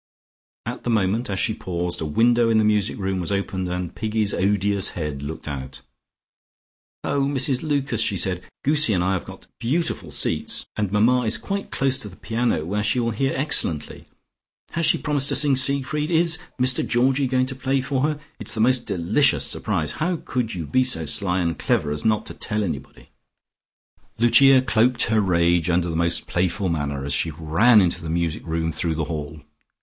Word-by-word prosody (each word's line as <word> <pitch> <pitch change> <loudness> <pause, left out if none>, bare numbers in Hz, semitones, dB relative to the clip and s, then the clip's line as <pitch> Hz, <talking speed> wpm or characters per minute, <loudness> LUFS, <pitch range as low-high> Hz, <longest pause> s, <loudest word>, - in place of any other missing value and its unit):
At - - -6
the - - -3
moment 110 +1 0
as 95 - -2
she 110 - +1
paused, 90 -3 -4
a - - -2
window 115 +9 +2
in 110 - +3
the 110 - +3
music 105 -1 +1
room 95 -1 -2
was 90 +2 -3
opened, 95 -2 -2
and 90 -1 -4
Piggy's 110 -2 -1
odious 100 0 +1
head 75 -4 -4
looked 75 +3 -7
out. 70 -1 -7 1.2
"Oh, 140 - -1
Mrs 135 -1 +1
Lucas," 145 -3 -1
she 100 - 0
said. 90 0 +1 0.2
"Goosie 150 -6 +5
and 90 - 0
I 95 +1 +1
have 95 - -3
got - - -12
beautiful 155 +9 -2
seats, - - -1
and 105 -3 -2
Mamma 120 +4 +2
is 110 - +4
quite 200 0 -5
close 135 -1 0
to 105 - -4
the 90 - -14
piano 115 -9 -2
where 105 +5 -2
she 110 +4 0
will 115 -1 0
hear 135 +5 -1
excellently. 130 - -1 0.6
Has 165 -1 0
she - - +4
promised 145 -2 +1
to - - +1
sing 145 -2 +5
Siegfried? 140 +3 +2
Is 170 0 +3 0.2
Mr 130 0 +3
Georgie 130 +3 +1
going 130 0 +1
to 130 0 -5
play 135 +1 -1
for 130 0 -2
her? 150 +1 -1 0.2
It's - - -1
the - - -4
most 125 +2 +2
delicious 100 - +2
surprise; 85 -9 -1
how 175 +3 -2
could 120 -5 -2
you 85 -3 -5
be 130 - +2
so 85 -11 +2
sly 90 +3 0
and 85 -1 -2
clever 75 - 0
as 75 0 -3
not 110 0 +1
to - - -5
tell 105 -1 -2
anybody?" 90 - -7 1.1
Lucia 130 +3 +5
cloaked 120 +1 +2
her 110 -2 +2
rage 85 -2 +1
under 85 0 0
the - - -4
most 85 +1 0
playful 90 +2 -1
manner, 70 -4 -3
as 70 - -3
she 85 - 0
ran 85 +9 +3
into 85 -3 0
the 80 - -6
music 85 -1 -2
room 80 0 -2
through 80 +1 -2
the 80 - -2
hall. 75 -1 -6
105 Hz, 195 wpm, -22 LUFS, 85-130 Hz, 1.2 s, Goosie